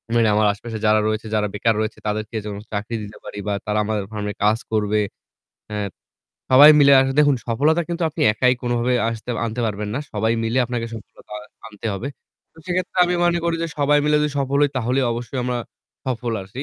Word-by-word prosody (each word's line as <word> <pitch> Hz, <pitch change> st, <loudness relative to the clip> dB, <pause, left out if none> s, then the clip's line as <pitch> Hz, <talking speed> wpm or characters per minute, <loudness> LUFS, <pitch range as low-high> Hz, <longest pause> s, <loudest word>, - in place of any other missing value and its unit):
মানে 115 Hz, -1 st, +4 dB
আমার 105 Hz, 0 st, +3 dB
আশেপাশে 110 Hz, +2 st, -7 dB
যারা 110 Hz, 0 st, +4 dB
রয়েছে 110 Hz, 0 st, -2 dB
যারা 105 Hz, -1 st, +1 dB
বেকার 110 Hz, +1 st, +1 dB
রয়েছে 110 Hz, 0 st, -3 dB
তাদেরকে 110 Hz, +2 st, -3 dB
যেন 105 Hz, -1 st, -5 dB, 0.2 s
চাকরি 105 Hz, +3 st, -3 dB
দিতে 105 Hz, +1 st, -10 dB
পারি -, -, -9 dB
বা 100 Hz, -, 0 dB
তারা 105 Hz, 0 st, -1 dB
আমাদের 105 Hz, -2 st, -1 dB
ফার্ম 105 Hz, -1 st, -4 dB
এ -, -, -7 dB
কাজ 105 Hz, +2 st, +4 dB
করবে। 105 Hz, -1 st, +1 dB, 0.7 s
হ্যা। 105 Hz, 0 st, -3 dB, 0.7 s
সবাই 145 Hz, +4 st, +10 dB
মিলে 140 Hz, 0 st, +7 dB
আসা 135 Hz, 0 st, +1 dB
দেখুন 145 Hz, -3 st, +5 dB
সফলতা 145 Hz, +8 st, +2 dB
কিন্তু 170 Hz, 0 st, -3 dB
আপনি -, -, -3 dB
একাই 125 Hz, +4 st, +3 dB
কোনভাবে 120 Hz, +1 st, 0 dB
আসতে 115 Hz, +1 st, -5 dB, 0.2 s
আনতে 115 Hz, +2 st, -4 dB
পারবেন 105 Hz, 0 st, -3 dB
না। 130 Hz, -, -1 dB
সবাই 110 Hz, +2 st, +1 dB
মিলে 115 Hz, +3 st, 0 dB
আপনাকে 120 Hz, -1 st, -3 dB
সফলতা 110 Hz, -1 st, -13 dB, 0.3 s
আনতে 110 Hz, 0 st, -8 dB
হবে। 115 Hz, +8 st, -4 dB, 0.4 s
তো -, -, -21 dB
সেক্ষেত্রে 185 Hz, +1 st, -2 dB
আমি 180 Hz, 0 st, 0 dB
মনে 175 Hz, 0 st, +2 dB
করি 170 Hz, -1 st, +1 dB
যে -, -, 0 dB
সবাই 145 Hz, +1 st, +4 dB
মিলে 150 Hz, 0 st, +3 dB
যদি 150 Hz, 0 st, +1 dB
সফল 140 Hz, +1 st, 0 dB
হয় 145 Hz, -, +3 dB
তাহলে 125 Hz, +2 st, +1 dB
অবশ্যই 120 Hz, +3 st, -5 dB
আমরা 125 Hz, -1 st, -1 dB, 0.5 s
সফল 120 Hz, -2 st, -2 dB
আসি। 115 Hz, +9 st, -7 dB
115 Hz, 200 wpm, -21 LUFS, 105-140 Hz, 0.7 s, সবাই